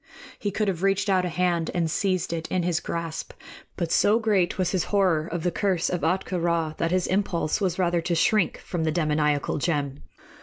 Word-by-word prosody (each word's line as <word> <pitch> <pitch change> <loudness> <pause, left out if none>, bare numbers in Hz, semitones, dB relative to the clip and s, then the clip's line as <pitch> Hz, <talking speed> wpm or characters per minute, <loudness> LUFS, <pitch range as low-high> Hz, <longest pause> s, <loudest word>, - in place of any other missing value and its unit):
He 205 - -1
could 210 +2 -1
have 180 -3 -1
reached 195 0 +2
out 185 -1 +2
a - - -1
hand 175 -1 0
and 175 -2 +1
seized 185 +1 0
it 165 -1 -3
in 185 -2 -1
his 175 -1 +1
grasp; 165 -2 -5 0.4
but 170 -3 -2
so 210 +2 +4
great 205 -6 +1
was 185 -2 0
his 185 -3 0
horror 180 -6 +2
of 170 -1 -3
the 175 - +1
curse 185 -2 0
of 180 -3 -1
Ahtka 180 +3 0
Rā 165 -2 0
that 165 - 0
his 180 0 +1
impulse 185 -3 0
was 185 -3 0
rather 175 -2 +1
to 170 +1 -1
shrink 195 +3 +2
from 175 -3 -3
the 160 - +1
demoniacal 150 -2 0
gem. 145 -3 -1
175 Hz, 205 wpm, -25 LUFS, 165-190 Hz, 0.4 s, so